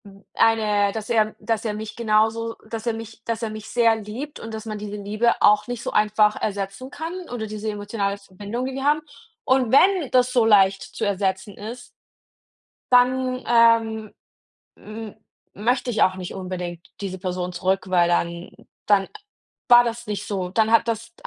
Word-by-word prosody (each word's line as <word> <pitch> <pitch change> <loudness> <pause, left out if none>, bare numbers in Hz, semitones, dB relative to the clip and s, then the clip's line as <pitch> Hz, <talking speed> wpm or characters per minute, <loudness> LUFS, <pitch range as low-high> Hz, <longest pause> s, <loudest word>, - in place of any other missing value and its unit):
Hm. 200 0 -15
Eine 210 -3 +3
dass 220 0 -6
er 220 -2 +2
dass 225 -2 -2
er 215 - -1
mich 215 0 -6
genauso 225 0 +1
s - - -20
dass 225 0 -5
er 235 - +1
mich 225 0 -9
dass 230 -1 -3
er 225 - -1
mich 215 0 -8
sehr 230 -2 +3
liebt 220 +8 -7
und 225 0 -8
dass 220 0 -6
man 215 -1 -5
diese 210 0 -6
Liebe 210 +4 +1
auch 210 +2 +5
nicht 245 -2 -5
so - - -3
einfach 210 0 +3
ersetzen 200 +5 -4
kann 320 +4 -6 0.2
oder 240 -3 -4
diese 215 +1 -4
emotionale 205 -1 -3
Verbindung, 205 +5 -6
die 265 - -4
wir 270 0 -4
haben. 295 +2 +3 0.4
Und 260 -3 +2
wenn 360 0 +4
das 250 0 +3
so 240 -3 +4
leicht 195 -3 +5
zu 210 - -7
ersetzen 195 0 -1
ist 230 +4 -8 1.0
dann, 255 +1 +3
ähm, 230 -2 +3 0.6
m 215 0 -9 0.4
möchte 245 +4 0
ich 220 - -1
auch 185 - +4
nicht 185 -1 -7
unbedingt 180 -2 -6 0.2
diese 190 -2 -5
Person 180 -1 -3
zurück, 190 +2 0
weil 175 -2 +4
dann 170 0 -1 0.4
dann 205 -2 +4
a - - -19 0.6
war 240 0 +9
das 235 -1 -4
nicht 210 -1 -4
so. 190 -3 -3
Dann 220 +3 +1
hat 230 0 +4
das 230 0 -3
215 Hz, 185 wpm, -23 LUFS, 200-235 Hz, 1.0 s, war